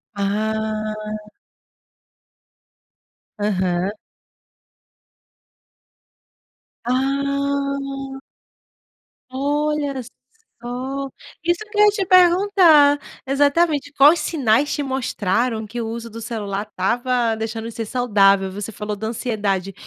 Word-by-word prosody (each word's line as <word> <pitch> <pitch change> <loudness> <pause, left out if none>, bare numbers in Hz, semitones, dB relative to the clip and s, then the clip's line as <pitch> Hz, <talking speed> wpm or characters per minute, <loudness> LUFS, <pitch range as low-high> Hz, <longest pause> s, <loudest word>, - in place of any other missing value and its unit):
Ah. 215 +1 -3 2.1
Aham. 185 -2 0 2.9
Ah. 275 +1 -1 1.1
Olha 285 +1 -1
só 235 - -13 1.3
isso 345 0 +1
que 430 - -6
eu 420 - +8
ia - - +7
te 400 -2 -2
perguntar, 350 -5 +5 0.3
exatamente, 290 +2 +2
quais 295 +5 +6
sinais 275 -2 +1
te 290 - -2
mostraram 235 -3 -1
que 235 +3 -5
o 225 - -3
uso 230 +1 -5
do 230 - -8
celular 210 -2 -4
estava 235 +4 0
deixando 225 0 -4
de - - -6
ser 225 - -4
saudável? 200 -6 +3
Você 205 +3 -6
falou 210 0 -5
da 215 +2 -5
ansiedade, 205 -5 -2
240 Hz, 90 wpm, -21 LUFS, 215-280 Hz, 2.9 s, eu